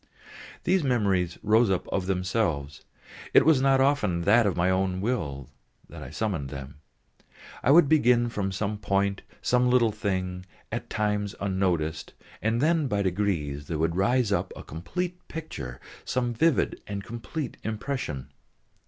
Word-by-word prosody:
These 185 Hz, -1 st, +2 dB
memories 100 Hz, -9 st, +1 dB
rose 110 Hz, +1 st, +4 dB
up 95 Hz, -2 st, 0 dB
of 95 Hz, -2 st, -1 dB
themselves, 90 Hz, -7 st, -1 dB, 0.5 s
it -, -, +7 dB
was 155 Hz, -4 st, +5 dB
not 135 Hz, 0 st, +4 dB
often 130 Hz, -11 st, +2 dB
that 105 Hz, +5 st, +4 dB
of 95 Hz, -, -1 dB
my 85 Hz, +1 st, +2 dB
own 95 Hz, 0 st, +1 dB
will 80 Hz, -, -3 dB, 0.4 s
I 70 Hz, -4 st, -8 dB
summoned 80 Hz, -4 st, -2 dB
them. 70 Hz, +1 st, -9 dB, 0.8 s
It 135 Hz, -, +4 dB
would 165 Hz, 0 st, +7 dB
begin 125 Hz, -5 st, +4 dB
from 100 Hz, -4 st, -2 dB
some 105 Hz, +2 st, -2 dB
point, 100 Hz, -1 st, 0 dB, 0.2 s
some 125 Hz, 0 st, +3 dB
little 120 Hz, -3 st, +4 dB
thing, 95 Hz, -3 st, -3 dB, 0.2 s
at -, -, -4 dB
times 105 Hz, -1 st, -1 dB
unnoticed, 90 Hz, -5 st, -1 dB, 0.3 s
and 110 Hz, +2 st, +1 dB
then 160 Hz, -1 st, +2 dB
by 105 Hz, -4 st, 0 dB
degrees 85 Hz, -7 st, -1 dB
there 80 Hz, -, -2 dB
would 80 Hz, +2 st, 0 dB
rise 120 Hz, +3 st, +2 dB
up 100 Hz, -, 0 dB
a -, -, -9 dB
complete 180 Hz, -, -5 dB
picture, 155 Hz, -, -7 dB, 0.2 s
some 120 Hz, -1 st, -1 dB
vivid 160 Hz, +5 st, +1 dB
and 100 Hz, -1 st, -4 dB
complete 120 Hz, +5 st, -5 dB
impression. 110 Hz, -, -4 dB
100 Hz, 145 wpm, -27 LUFS, 90-125 Hz, 0.8 s, it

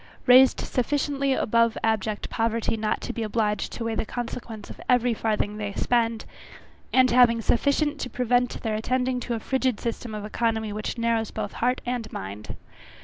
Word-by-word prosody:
Raised 255 Hz, +1 st, +7 dB
sufficiently 275 Hz, +1 st, 0 dB
above 230 Hz, -2 st, +2 dB
abject 220 Hz, -1 st, 0 dB
poverty 230 Hz, 0 st, 0 dB
not 215 Hz, -1 st, -1 dB
to -, -, -4 dB
be 230 Hz, -, -4 dB
obliged 210 Hz, -2 st, -1 dB
to 235 Hz, -, -5 dB
weigh 230 Hz, 0 st, -1 dB
the -, -, -1 dB
consequence 230 Hz, -2 st, -6 dB
of -, -, -12 dB
every 245 Hz, -1 st, +3 dB
farthing 210 Hz, -1 st, -1 dB
they 205 Hz, -1 st, -4 dB
spend, 230 Hz, -1 st, 0 dB, 0.7 s
and 255 Hz, -1 st, +5 dB
having 240 Hz, -1 st, +5 dB
sufficient 285 Hz, +6 st, +1 dB
to 250 Hz, -, -4 dB
prevent 245 Hz, 0 st, 0 dB
their 220 Hz, -, -1 dB
attending 250 Hz, +3 st, 0 dB
to 240 Hz, -1 st, -3 dB
a -, -, -3 dB
frigid 260 Hz, -1 st, 0 dB
system 230 Hz, -1 st, -4 dB
of 210 Hz, -1 st, -5 dB
economy 220 Hz, -1 st, -1 dB
which 215 Hz, +3 st, -4 dB
narrows 230 Hz, -1 st, 0 dB
both 210 Hz, -2 st, -5 dB
heart 250 Hz, +2 st, 0 dB
and 240 Hz, -3 st, -3 dB
mind. 100 Hz, +2 st, -6 dB
230 Hz, 170 wpm, -25 LUFS, 220-250 Hz, 0.7 s, Raised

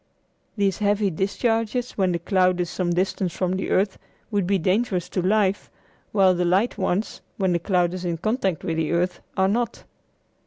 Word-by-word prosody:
These 195 Hz, -3 st, +1 dB
heavy 205 Hz, -1 st, +2 dB
discharges 225 Hz, +6 st, -1 dB
when 190 Hz, -2 st, +1 dB
the 170 Hz, -, 0 dB
cloud 185 Hz, +1 st, +2 dB
is 175 Hz, -1 st, -1 dB
some 180 Hz, -2 st, -1 dB
distance 185 Hz, 0 st, -1 dB
from 185 Hz, -1 st, 0 dB
the 190 Hz, 0 st, -2 dB
earth 195 Hz, +1 st, +1 dB, 0.3 s
would 200 Hz, -4 st, 0 dB
be 200 Hz, 0 st, +3 dB
dangerous 185 Hz, +1 st, 0 dB
to 185 Hz, -, -1 dB
life, 200 Hz, +1 st, +1 dB, 0.4 s
while 190 Hz, -3 st, +4 dB
the 180 Hz, 0 st, 0 dB
light 190 Hz, +7 st, +2 dB
ones, 190 Hz, +2 st, -2 dB, 0.2 s
when 190 Hz, -3 st, +1 dB
the 170 Hz, -, +1 dB
cloud 175 Hz, -1 st, +1 dB
is 185 Hz, 0 st, -5 dB
in 170 Hz, -2 st, -1 dB
contact 195 Hz, -, -1 dB
with 165 Hz, -3 st, -2 dB
the 160 Hz, 0 st, 0 dB
earth, 175 Hz, +1 st, 0 dB, 0.2 s
are 190 Hz, 0 st, +4 dB
not. 235 Hz, +4 st, -1 dB
190 Hz, 185 wpm, -24 LUFS, 180-205 Hz, 0.4 s, while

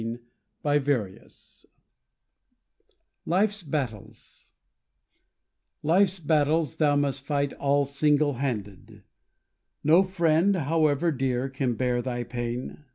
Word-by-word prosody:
Life's 140 Hz, -9 st, -2 dB, 1.9 s
Battles 135 Hz, -, -6 dB, 1.4 s
Life's 185 Hz, +4 st, +3 dB
battles 155 Hz, -1 st, +1 dB
thou 145 Hz, -2 st, +3 dB
must 140 Hz, -1 st, 0 dB
fight 140 Hz, -1 st, -1 dB
all 140 Hz, 0 st, +1 dB
single 145 Hz, +1 st, +1 dB
handed; 105 Hz, -8 st, -5 dB, 0.8 s
No 160 Hz, +5 st, +6 dB
friend, 185 Hz, 0 st, +2 dB
however 160 Hz, 0 st, +1 dB
dear, 130 Hz, -2 st, -1 dB
can 130 Hz, -2 st, -2 dB
bear 125 Hz, 0 st, 0 dB
thy 120 Hz, -1 st, -3 dB
pain. 120 Hz, +4 st, -5 dB
145 Hz, 85 wpm, -26 LUFS, 125-155 Hz, 1.9 s, No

